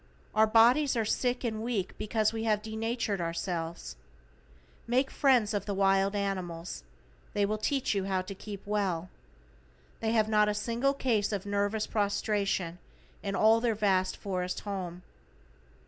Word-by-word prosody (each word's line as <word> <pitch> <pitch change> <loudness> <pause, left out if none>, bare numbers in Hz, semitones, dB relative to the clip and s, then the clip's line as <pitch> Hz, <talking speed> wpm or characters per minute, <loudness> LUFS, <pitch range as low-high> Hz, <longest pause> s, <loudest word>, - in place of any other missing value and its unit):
Our 220 0 +5
bodies 245 +6 +5
are 225 - +1
sick 245 +3 0
and 220 -3 -2
weak 220 -5 -2
because 215 0 +1
we 225 0 -3
have 210 -1 +1
denatured 220 -2 -2
ourselves. 165 - -3 0.9
Make 260 +3 +2
friends 250 -7 +3
of 205 -1 -2
the 200 - -1
wild 195 +1 +3
animals, 185 -4 -3 0.5
they 205 -1 +3
will 215 +1 -2
teach 270 +2 0
you 195 -2 -1
how 190 -1 0
to 195 - -7
keep 200 0 -9
well. 190 -4 -1 0.9
They 225 0 0
have 215 -2 +3
not 210 -1 +3
a 210 - -1
single 235 +6 0
case 225 -7 +1
of 200 -1 -3
nervous 205 +1 0
prostration 200 -4 -1 0.4
in 195 -1 -3
all 220 +3 +5
their 230 -2 +1
vast 190 -3 +1
forest 185 -2 -3
home. 185 -3 -5
210 Hz, 150 wpm, -30 LUFS, 195-225 Hz, 0.9 s, Our